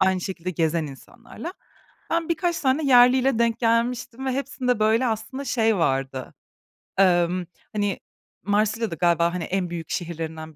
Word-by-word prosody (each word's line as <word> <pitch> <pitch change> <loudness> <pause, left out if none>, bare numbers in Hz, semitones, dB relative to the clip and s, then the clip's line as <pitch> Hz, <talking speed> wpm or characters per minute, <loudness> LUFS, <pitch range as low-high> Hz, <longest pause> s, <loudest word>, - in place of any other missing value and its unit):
aynı 190 -1 +3
şekilde 185 -1 -4
gezen 165 -1 0
insanlarla. 240 - -10 0.6
Ben 335 0 0
birkaç 340 +1 0
tane 275 +3 +1
yerliyle 250 -1 +5
denk 235 0 +2
gelmiştim 240 +2 0
ve 260 - +1
hepsinde 260 -3 -1
böyle 220 +4 +3
aslında 225 +5 -3
şey 225 -4 +2
vardı, 135 -5 -1 0.6
emm, 180 -1 +3 0.3
hani, 205 -2 -1 0.4
Marsilya 215 +2 +1
da 165 - -3
galiba, 170 +1 +2
hani, 180 - -3
en 185 -1 -2
büyük 165 -2 -6
şehirlerinden 160 -2 -5
215 Hz, 140 wpm, -24 LUFS, 170-250 Hz, 0.6 s, yerliyle